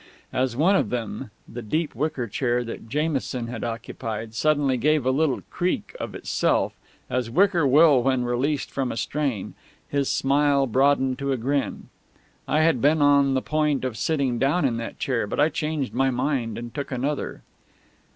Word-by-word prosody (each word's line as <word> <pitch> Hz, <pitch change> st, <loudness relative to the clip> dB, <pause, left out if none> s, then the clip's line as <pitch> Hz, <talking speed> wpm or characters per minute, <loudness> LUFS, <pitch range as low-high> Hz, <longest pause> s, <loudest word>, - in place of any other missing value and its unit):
As 125 Hz, -2 st, 0 dB
one 180 Hz, +7 st, +4 dB
of -, -, +1 dB
them, 120 Hz, 0 st, -4 dB, 0.2 s
the 120 Hz, -, -7 dB
deep 155 Hz, +8 st, -2 dB
wicker 140 Hz, 0 st, -2 dB
chair 120 Hz, +2 st, 0 dB
that 115 Hz, -1 st, -8 dB
Jamison 140 Hz, -4 st, -1 dB
had 115 Hz, -1 st, -6 dB
occupied, 115 Hz, -1 st, -5 dB
suddenly 145 Hz, +1 st, +2 dB
gave 150 Hz, +2 st, +2 dB
a 130 Hz, -, +3 dB
little 140 Hz, 0 st, +1 dB
creak 180 Hz, -, -2 dB
of -, -, -5 dB
itself, -, -, 0 dB, 0.3 s
as 125 Hz, -2 st, -2 dB
wicker 175 Hz, -, +3 dB
will 145 Hz, -1 st, +6 dB
when 130 Hz, 0 st, +1 dB
released 135 Hz, +4 st, -1 dB
from 135 Hz, -2 st, -2 dB
a -, -, -5 dB
strain, 130 Hz, -3 st, -2 dB, 0.3 s
his 140 Hz, -1 st, 0 dB
smile 140 Hz, 0 st, +2 dB
broadened 130 Hz, +1 st, +2 dB
to 140 Hz, 0 st, -1 dB
a 130 Hz, -, +1 dB
grin. 135 Hz, +4 st, -2 dB, 0.6 s
I 155 Hz, -, +2 dB
had 155 Hz, -6 st, +3 dB
been 150 Hz, +3 st, +4 dB
on 140 Hz, -2 st, +4 dB
the 130 Hz, -, 0 dB
point 150 Hz, -3 st, 0 dB
of 125 Hz, -4 st, -3 dB
sitting 135 Hz, -1 st, 0 dB
down 145 Hz, +4 st, +2 dB
in 120 Hz, -4 st, +1 dB
that 115 Hz, -, -6 dB
chair, 120 Hz, -5 st, -1 dB
but -, -, -4 dB
I 150 Hz, +2 st, +5 dB
changed 155 Hz, -4 st, -2 dB
my 135 Hz, +2 st, +2 dB
mind 125 Hz, -3 st, -1 dB
and 120 Hz, 0 st, -7 dB
took 140 Hz, -1 st, -5 dB
another. 140 Hz, +3 st, -3 dB
135 Hz, 175 wpm, -24 LUFS, 120-150 Hz, 0.6 s, will